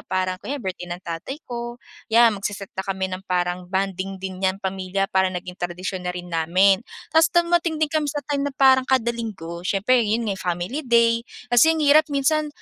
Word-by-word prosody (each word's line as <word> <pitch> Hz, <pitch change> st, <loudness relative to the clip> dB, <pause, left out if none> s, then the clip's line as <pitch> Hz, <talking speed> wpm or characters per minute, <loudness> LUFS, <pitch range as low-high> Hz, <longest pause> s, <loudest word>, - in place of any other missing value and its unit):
parang 185 Hz, 0 st, -1 dB
kunwari 285 Hz, -, -4 dB, 0.2 s
birthday 180 Hz, 0 st, -10 dB
ng 175 Hz, +1 st, -6 dB
tatay 170 Hz, +10 st, -5 dB
ko, 240 Hz, -1 st, -6 dB, 0.3 s
yan 230 Hz, +1 st, +6 dB
magse-set 200 Hz, -1 st, -5 dB
na -, -, -4 dB
kami 190 Hz, -1 st, -2 dB
ng 185 Hz, -, -4 dB
parang 180 Hz, 0 st, -1 dB
bonding 195 Hz, 0 st, -2 dB
din 190 Hz, -1 st, -5 dB
'yan 190 Hz, 0 st, +1 dB
pamilya 190 Hz, 0 st, -1 dB
para 190 Hz, 0 st, +3 dB
naging 180 Hz, 0 st, -7 dB
tradisyon 180 Hz, +2 st, -4 dB
na 180 Hz, -, -2 dB
rin 180 Hz, 0 st, -7 dB
namin. 185 Hz, +4 st, +3 dB, 0.3 s
Tas 320 Hz, +1 st, +6 dB
dumating 340 Hz, -1 st, +2 dB
din 305 Hz, -, +1 dB
kami 310 Hz, -1 st, +1 dB
sa 290 Hz, +1 st, -3 dB
time 285 Hz, 0 st, -1 dB
na -, -, -9 dB
parang 265 Hz, -1 st, +5 dB
kada 255 Hz, -3 st, +2 dB
Linggo, 190 Hz, -8 st, -6 dB
siyempre 210 Hz, +7 st, +2 dB
yun 225 Hz, +3 st, 0 dB
nga 195 Hz, -, -3 dB
family 180 Hz, -, -2 dB
day 235 Hz, -1 st, +4 dB, 0.3 s
kasi 280 Hz, +7 st, +6 dB
ang 315 Hz, -, -1 dB
hirap 295 Hz, +1 st, +6 dB
minsan 300 Hz, +2 st, +1 dB
195 Hz, 195 wpm, -23 LUFS, 185-265 Hz, 0.3 s, yan